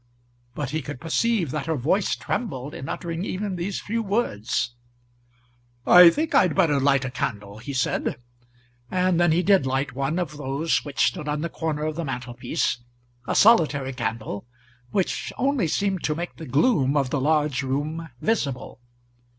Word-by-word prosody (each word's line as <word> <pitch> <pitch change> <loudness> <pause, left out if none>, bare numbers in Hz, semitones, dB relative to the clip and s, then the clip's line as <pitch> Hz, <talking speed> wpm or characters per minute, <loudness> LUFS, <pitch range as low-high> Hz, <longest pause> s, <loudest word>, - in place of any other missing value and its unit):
But 145 -3 -3
he 155 +1 -1
could 125 - -7
perceive 175 - 0
that 150 +1 -3
her 160 - +1
voice 160 +9 +1
trembled 145 - -4
in 135 - -7
uttering 170 0 -4
even 195 0 -3
these 180 +3 -3
few 230 +2 -2
words. 125 - -1 1.1
"I 180 -1 +9
think 310 - -2
I'd 180 -5 +4
better 145 -4 +3
light 135 -1 +3
a 130 - -4
candle," 105 -5 -4
he 125 +5 -6
said; 130 -1 0 0.7
and 185 -1 +1
then 175 -1 +4
he 170 +3 +2
did 190 -7 +4
light 135 +2 -1
one 140 +5 -1
of 155 -5 -3
those 145 +3 0
which 145 -2 +1
stood 150 - -2
on 150 0 -1
the 170 - -2
corner 155 -2 -3
of 155 0 -3
the 170 - -2
mantelpiece, 125 -3 -2 0.5
a - - -1
solitary 150 - +4
candle, 115 -3 -4 0.4
which 185 +8 -1
only 265 - +1
seemed 195 +2 0
to 150 - 0
make 175 +2 -5
the 160 - -8
gloom 145 - +2
of 135 -3 0
the 145 - 0
large 150 -2 +2
room 150 +5 -3
visible. 140 - -2
150 Hz, 165 wpm, -24 LUFS, 135-180 Hz, 1.1 s, I